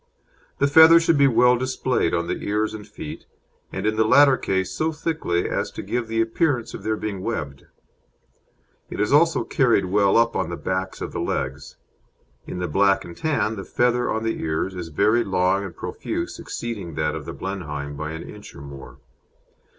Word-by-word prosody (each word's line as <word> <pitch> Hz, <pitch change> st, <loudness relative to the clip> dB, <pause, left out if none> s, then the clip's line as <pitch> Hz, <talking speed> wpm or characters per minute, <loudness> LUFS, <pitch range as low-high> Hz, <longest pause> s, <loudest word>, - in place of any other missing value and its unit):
The 140 Hz, -, +2 dB
feather 160 Hz, +3 st, +8 dB
should 165 Hz, -2 st, +2 dB
be 140 Hz, -, +6 dB
well 125 Hz, 0 st, +5 dB
displayed 130 Hz, -6 st, 0 dB
on 85 Hz, -, 0 dB
the -, -, -3 dB
ears 105 Hz, +1 st, -1 dB
and 105 Hz, -1 st, -8 dB
feet, 80 Hz, -7 st, -9 dB, 0.4 s
and -, -, -4 dB
in 110 Hz, 0 st, 0 dB
the 110 Hz, -, +4 dB
latter 140 Hz, +4 st, +6 dB
case 95 Hz, -5 st, -1 dB
so 155 Hz, +11 st, -1 dB
thickly 150 Hz, -, -1 dB
as -, -, -2 dB
to -, -, -6 dB
give 120 Hz, -1 st, -2 dB
the 115 Hz, 0 st, 0 dB
appearance 120 Hz, +2 st, 0 dB
of -, -, -7 dB
their 110 Hz, 0 st, -1 dB
being 100 Hz, -4 st, -4 dB
webbed. 75 Hz, -11 st, -5 dB, 1.2 s
It -, -, -7 dB
is 105 Hz, +5 st, +1 dB
also 165 Hz, +3 st, +4 dB
carried 120 Hz, -8 st, +2 dB
well 100 Hz, +2 st, +3 dB
up 115 Hz, 0 st, +3 dB
the 85 Hz, +1 st, -2 dB
backs 95 Hz, 0 st, -3 dB
of -, -, -4 dB
the -, -, -4 dB
legs. 65 Hz, +2 st, -3 dB, 0.7 s
In -, -, -5 dB
the 90 Hz, 0 st, -2 dB
Black 95 Hz, +3 st, +2 dB
and 85 Hz, -, -10 dB
Tan 145 Hz, -, -1 dB
the 95 Hz, -, -5 dB
feather 120 Hz, +2 st, +1 dB
on 110 Hz, 0 st, -1 dB
the 115 Hz, -, -2 dB
ears 80 Hz, +4 st, -2 dB
is 90 Hz, -2 st, -6 dB
very 105 Hz, +9 st, +2 dB
long 95 Hz, 0 st, +1 dB
and 95 Hz, -4 st, -7 dB
profuse, -, -, -5 dB
exceeding 105 Hz, -9 st, -6 dB
that 75 Hz, 0 st, 0 dB
of -, -, -6 dB
the -, -, -6 dB
Blenheim 75 Hz, -7 st, -5 dB
by 75 Hz, +2 st, -5 dB
an 80 Hz, -, -6 dB
inch -, -, -11 dB
or 70 Hz, -, -10 dB
more. 70 Hz, -1 st, -11 dB
105 Hz, 190 wpm, -23 LUFS, 85-120 Hz, 1.2 s, feather